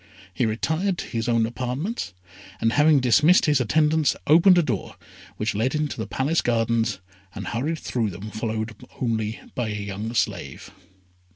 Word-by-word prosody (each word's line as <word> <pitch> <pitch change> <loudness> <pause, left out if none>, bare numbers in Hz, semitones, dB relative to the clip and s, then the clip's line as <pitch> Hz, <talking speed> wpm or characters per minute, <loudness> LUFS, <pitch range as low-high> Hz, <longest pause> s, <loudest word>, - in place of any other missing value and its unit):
He 100 +6 +1
retired 160 - -1
to - - -4
his 115 0 -3
own 115 -1 +3
apartments, 130 - -3 0.5
and, 115 0 +1
having 150 -1 +5
dismissed 150 +9 +5
his 145 -3 +3
attendants, 155 +4 +2
opened 170 +5 +6
a 175 - +4
door 120 - -3 0.4
which 105 +1 -1
led 115 +8 0
into 150 -1 -2
the 110 -1 -4
Palace 135 +9 0
Gardens, 115 -1 +1 0.4
and 100 - -5
hurried 140 - -2
through 115 -7 -2
them, 95 +4 -8
followed 110 0 -3 0.3
only 110 -3 -1
by 120 -3 -2
a 105 - -3
young 100 +2 -4
slave. - - -2
120 Hz, 160 wpm, -24 LUFS, 110-150 Hz, 0.5 s, opened